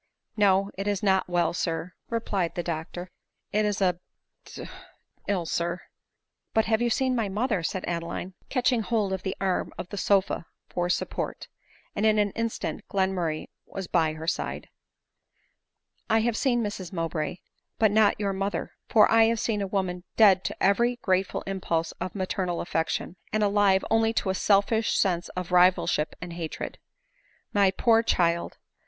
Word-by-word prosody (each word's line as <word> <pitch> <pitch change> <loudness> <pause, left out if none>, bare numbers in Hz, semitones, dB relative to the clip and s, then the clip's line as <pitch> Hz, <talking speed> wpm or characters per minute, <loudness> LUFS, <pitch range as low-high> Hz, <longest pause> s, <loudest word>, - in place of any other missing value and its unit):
No, 200 -1 +3
it 200 - -2
is 205 -1 -1
not 190 -2 +2
well 175 -2 +1
sir," 170 +1 -2 0.2
replied 205 -7 -1
the 175 - -2
doctor; 170 +2 -5 0.2
" - - -54
it 210 +1 +2
is 210 -1 0
d, 190 -3 +3 0.3
— - - -51
d - - -8 0.6
ill, 190 -4 0
sir." 170 +2 -1 0.4
*' - - -52
You 220 - +5
have 230 +2 +1
seen 260 +1 +1
my 225 -4 0
mother," 210 -1 0
said 180 +3 -3
Adeline, 170 +2 -4 0.2
catching 250 -2 +2
hold 210 -3 0
of 190 - -3
the 190 - -4
arm 190 -2 0
of 180 - -6
the 205 - -5
sofa 195 -4 +1 0.2
for 175 0 -2
support; - - -2 0.5
and 205 - -1
in 215 -1 +4
an 205 -1 +2
instant 230 0 -3
Glenmurray 185 -5 -1 0.2
was 195 - -5
by 160 -3 +1
her 160 +1 -7
side. 170 - -3 0.7
" - - -46
I 220 0 +4
have 235 0 0
seen 240 -2 +1
Mrs 200 -4 -5
Mowbray, 165 -2 -2 0.4
but 220 -2 +4
not 210 -1 +4
your 200 -2 0
mother; 195 +1 -2 0.2
for 215 -2 +6
I 225 0 +6
have 230 0 +1
seen 210 -2 0
a 200 - -1
woman 185 -2 -2
dead 195 -4 +6
to - - -4
every 235 +5 +3
grateful 185 0 0
impulse 170 -4 -1
of 185 +2 -4
maternal 185 -2 -2
affection, 165 +1 -2
and 215 0 +1
alive 200 -2 +3
only 225 0 +3
to 195 -4 0
a - - -1
selfish 205 +3 +2
sense 175 -2 +1
of 180 -1 -4
rivalship 180 -3 +3
and 175 0 -7
hatred. 165 -2 -5 0.7
My 200 -2 +5
poor 225 +4 +3
child! 170 -6 +1
195 Hz, 170 wpm, -27 LUFS, 175-215 Hz, 0.7 s, for